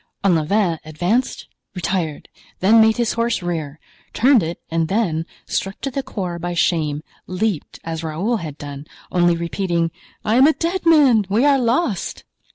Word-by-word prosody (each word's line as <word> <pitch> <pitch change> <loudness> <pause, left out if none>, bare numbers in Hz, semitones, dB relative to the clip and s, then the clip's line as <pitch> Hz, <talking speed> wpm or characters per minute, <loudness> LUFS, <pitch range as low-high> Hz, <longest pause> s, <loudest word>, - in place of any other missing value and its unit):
Olivain 175 0 +2
advanced, 175 +11 -1 0.3
retired, 175 -3 -2 0.3
then 220 +4 +6
made 220 +1 +4
his 235 -2 +1
horse 230 -4 0
rear—turned 175 - 0
it 165 +1 -4
and 165 -1 +1
then, 170 -5 0 0.2
struck 195 +1 -3
to 275 - -3
the 275 - -2
core 180 -8 -5
by 175 +1 -3
shame, 155 -3 +1 0.2
leaped, 185 -2 -2
as 165 0 -4
Raoul 180 +10 -1
had 155 -7 -7
done, 145 0 -8 0.2
only 175 -1 +3
repeating: 170 -1 -1 0.3
"I 220 +3 +2
am 265 +3 +7
a 315 - +4
dead 340 +2 -2
man! 265 - +5
we 220 +7 +2
are 280 -2 +4
lost!" 235 - -1
185 Hz, 155 wpm, -20 LUFS, 165-230 Hz, 0.3 s, am